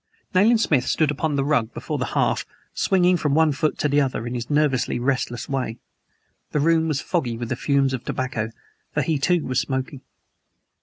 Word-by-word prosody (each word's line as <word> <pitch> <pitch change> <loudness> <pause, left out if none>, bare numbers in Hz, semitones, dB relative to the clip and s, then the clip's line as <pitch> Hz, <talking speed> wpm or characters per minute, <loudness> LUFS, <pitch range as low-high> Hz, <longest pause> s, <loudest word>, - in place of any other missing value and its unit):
Nayland 215 +5 +5
Smith 135 - +2
stood 155 -2 +2
upon 150 +1 -1
the 135 -1 0
rug 140 -7 0
before - - -4
the - - 0
hearth, - - +2 0.3
swinging 180 -1 +3
from 150 -3 0
one 160 -1 +4
foot 150 +2 -1
to - - +1
the 145 0 +3
other, 130 -4 -2
in 120 - -4
his 120 -1 -4
nervously 145 -4 +1
restless 125 -1 -1
way. 130 -4 -2 0.8
The 150 - +2
room 160 +2 +3
was 150 -3 -1
foggy 125 -10 -1
with 120 -1 -5
the - - 0
fumes 140 0 +1
of 125 - -3
tobacco, 125 -4 -2 0.5
for 150 - +2
he, 155 0 0
too, 175 +3 +1
was 130 0 0
smoking. 130 0 -3
140 Hz, 195 wpm, -23 LUFS, 130-155 Hz, 0.8 s, Nayland